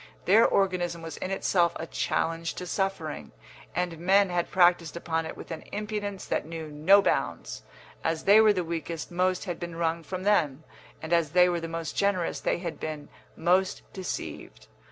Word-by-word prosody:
Their 215 +5 +6
organism 175 -3 0
was 165 -3 -7
in 185 - -4
itself 175 -3 +2
a 160 - -5
challenge 165 0 -1
to 180 - -6
suffering, 180 -4 -3 0.4
and 175 -2 -2
men 190 +2 +4
had 175 -1 0
practised 175 -3 +3
upon 165 -1 -2
it - - -8
with - - -10
an 160 - -5
impudence 205 -2 -4
that - - -1
knew 160 -1 -7
no 185 +7 +5
bounds. - - -1 0.4
As 160 0 -1
they 205 +2 +7
were 215 -1 +6
the 185 -3 0
weakest 165 0 -4
most 185 +2 0
had 175 -4 -4
been 170 -1 -6
wrung 165 0 -1
from 185 +4 -6
them, 155 -8 +2 0.4
and 160 +2 -2
as 165 -3 +2
they 180 0 +6
were 175 -1 -1
the 165 - -4
most 165 -1 -5
generous 200 -4 0
they - - 0
had 170 -2 -5
been 155 -2 -5 0.3
most 185 +2 +1
deceived. 190 -2 -6
175 Hz, 180 wpm, -27 LUFS, 165-190 Hz, 0.4 s, they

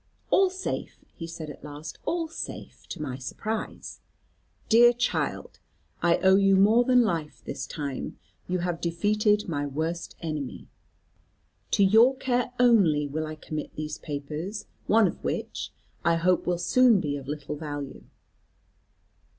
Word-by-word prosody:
"All 385 -1 +5
safe," 375 +1 -5
he 165 - -6
said 165 -2 -7
at - - -14
last, 150 +1 -8
"all 335 -1 -1
safe, 325 - -8
to - - -7
my 135 -4 -4
surprise. 215 - -5 0.7
Dear 240 +1 +7
child, 240 +1 -2 0.4
I 170 -1 +4
owe 190 0 +6
you 195 -1 +5
more 215 +5 +5
than 250 0 +5
life 165 -8 -2
this - - -5
time. 140 -4 -5 0.3
You 185 - 0
have 175 -2 -2
defeated 210 +5 +1
my 145 -4 -2
worst 160 +4 -3
enemy. 155 -5 -5 1.0
To 200 - +3
your 225 +7 +6
care 250 -2 0
only 195 -12 +5
will 155 +2 -3
I 155 - -6
commit 155 0 -6
these 155 0 -5
papers, 155 +8 -5 0.2
one 220 0 +5
of - - -6
which, - - -3 0.3
I 170 - +3
hope 180 +2 +2
will 175 -1 +1
soon 230 +5 +4
be 145 -5 -2
of 135 -2 -7
little 150 0 -4
value. 145 -2 -6
170 Hz, 145 wpm, -27 LUFS, 150-220 Hz, 1.0 s, Dear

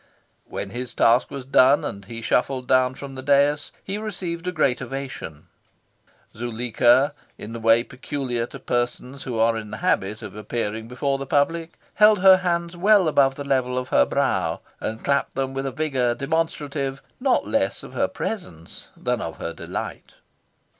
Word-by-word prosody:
When - - -5
his 125 +1 -5
task 120 +2 +4
was 140 -3 -7
done 135 +1 +5
and 100 -1 -6
he 115 +2 -8
shuffled 130 +1 0
down 130 0 +3
from 140 0 -8
the 130 - -6
dais, 145 +2 +2
he 200 +2 -4
received 180 -5 -4
a - - +1
great 140 -7 +1
ovation. 130 - -6 0.9
Zuleika, 120 +4 +2 0.2
in 110 - -8
the 115 - -5
way 115 +1 +4
peculiar 125 -2 -3
to - - -9
persons 125 +2 -3
who 125 -3 -3
are 115 +1 +3
in 110 -1 -5
the 105 - -6
habit 105 +1 0
of 105 - -8
appearing 110 0 -3
before 135 +3 -1
the 135 - -5
public, 165 +4 +1 0.2
held 210 0 +6
her 190 -1 +8
hands 170 -1 -1
well 195 0 +4
above 135 -3 +3
the 145 - -5
level 130 -2 0
of 130 0 -3
her - - +4
brow, - - 0 0.2
and 110 +1 -4
clapped 140 0 0
them 135 0 -2
with 135 0 -2
a - - -2
vigour 130 -4 0
demonstrative 140 -2 -2 0.2
not 260 0 +2
less 280 +1 0
of - - -10
her - - +1
presence 85 - -6
than - - -1
of - - -5
her 85 - -4
delight. - - -6
135 Hz, 175 wpm, -23 LUFS, 120-150 Hz, 0.9 s, her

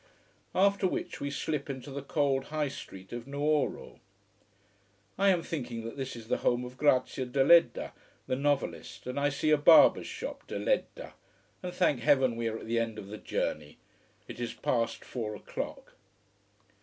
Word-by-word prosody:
After 200 0 +3
which - - -4
we 140 - -2
slip 145 0 -3
into 135 +1 -6
the 140 +1 -4
cold 140 -1 0
high 150 -2 -1
street 95 -9 -10
of 120 +1 -6
Nuoro. 145 +1 -1 1.2
I 200 +1 +3
am 175 -3 +2
thinking 120 -7 -4
that 115 - -6
this 135 -2 -4
is 115 -2 -10
the - - +1
home 125 0 +1
of 125 +1 -9
Grazia 130 -2 +2
Deledda, 140 +7 +4 0.3
the - - -1
novelist, 145 +1 -2
and 125 +2 -3
I 145 0 +2
see 150 +2 0
a 150 - +6
barber's 155 +3 +7
shop. - - -7
De - - -4
Ledda. - - -1 0.5
And 180 - -4
thank 175 -7 +2
heaven 130 -3 +3
we 115 0 -2
are 110 0 -2
at - - -9
the 115 +1 0
end 115 -1 -2
of 100 - -8
the 105 0 -7
journey. 75 -1 -3 0.5
It - - -9
is 120 -1 -4
past 115 -1 -1
four 110 -4 -4
o'clock. - - -6
135 Hz, 170 wpm, -30 LUFS, 120-150 Hz, 1.2 s, barber's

